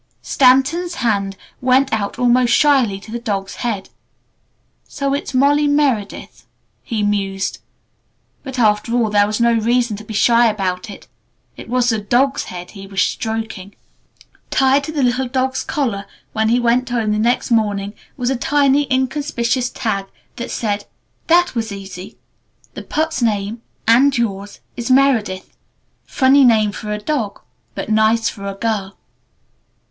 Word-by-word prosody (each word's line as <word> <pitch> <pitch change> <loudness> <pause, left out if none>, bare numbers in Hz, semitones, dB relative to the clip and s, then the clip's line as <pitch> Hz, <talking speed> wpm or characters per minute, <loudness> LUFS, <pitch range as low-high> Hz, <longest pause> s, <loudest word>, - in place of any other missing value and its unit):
Stanton's 285 +7 +3
hand 200 -6 -1 0.2
went 260 +1 +3
out 205 -2 -2
almost 245 0 +3
shyly 260 -10 +3
to 215 - -13
the 235 - -4
dog's 200 -5 -4
head. 215 -5 -3 1.0
"So 275 -1 -2
it's 280 -1 -3
'Molly 290 +3 +3
Meredith'," 275 -8 -1 0.3
he 220 -4 -3
mused. 195 -2 -1 0.8
But 265 -2 -7
after 215 0 +2
all 230 -3 +1
there 205 0 +4
was 215 +1 -2
no 235 0 +3
reason 235 0 +1
to 215 - -10
be 215 0 -8
shy 235 +2 +4
about 195 -2 -2
it. 200 - -11 0.5
It - - -11
was 250 0 +2
the 220 -2 +1
dog's 250 +7 +1
head 180 0 -8
he 195 -1 -10
was 195 -1 -4
stroking. 220 -3 -2 0.7
Tied 270 +1 +3
to 310 - -5
the 295 -3 -1
little 255 +1 +1
dog's 260 +1 -1
collar 215 -9 -2 0.3
when 220 0 +1
he 240 +2 +3
went 245 +1 +1
home 230 -3 0
the 210 - 0
next 240 +3 0
morning 205 -3 0 0.2
was 250 0 -1
a - - 0
tiny, 280 +1 +2
inconspicuous 260 -2 0
tag 200 -6 -3 0.3
that 240 - -5
said 205 -2 -2 0.4
"That 350 +1 +4
was 225 -3 -3
easy! 195 -1 -9 0.6
The - - -7
pup's 315 -2 -2
name 215 0 -1 0.3
and 260 +4 +5
yours 200 -3 -3
is 240 -1 -4
'Meredith.' 250 -8 +2 0.5
Funny 270 +1 +4
name 220 -4 +4
for 210 +1 -6
a 210 - -1
dog 215 -2 -3 0.4
but - - -5
nice 220 +1 +3
for 200 -2 -8
a 195 - -4
girl." 200 -2 -3
235 Hz, 155 wpm, -18 LUFS, 205-260 Hz, 1.0 s, and